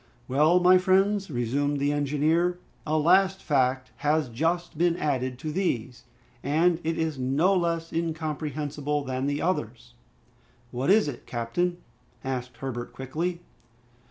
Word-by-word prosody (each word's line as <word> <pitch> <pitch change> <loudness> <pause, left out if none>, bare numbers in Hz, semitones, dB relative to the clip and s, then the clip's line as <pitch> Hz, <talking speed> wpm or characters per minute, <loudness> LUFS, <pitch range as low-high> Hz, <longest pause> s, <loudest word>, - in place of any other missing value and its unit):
"Well, 150 +7 +4
my 180 +1 +6
friends," 195 +2 +2
resumed 140 +3 -1
the 140 +1 +1
engineer, 150 +5 +1 0.3
"a 155 +1 +1
last 190 +4 +4
fact 130 -3 +1
has 150 -2 +1
just 165 +9 -1
been 170 +2 +2
added 130 -5 -1
to 155 +4 -5
these, 130 - -2 0.4
and 165 +5 +2
it 165 +1 -1
is 160 -4 -2
no 140 +9 +2
less 170 -2 -1
incomprehensible 150 -3 -2
than 130 0 -2
the 145 +1 -1
others!" 120 -8 -3 0.8
"What 130 +5 -2
is 210 -1 +5
it, 135 -5 -7
captain?" 175 +10 -1 0.5
asked 125 -2 -4
Herbert 120 -2 -5
quickly. 170 +7 -3
150 Hz, 130 wpm, -26 LUFS, 130-170 Hz, 0.8 s, my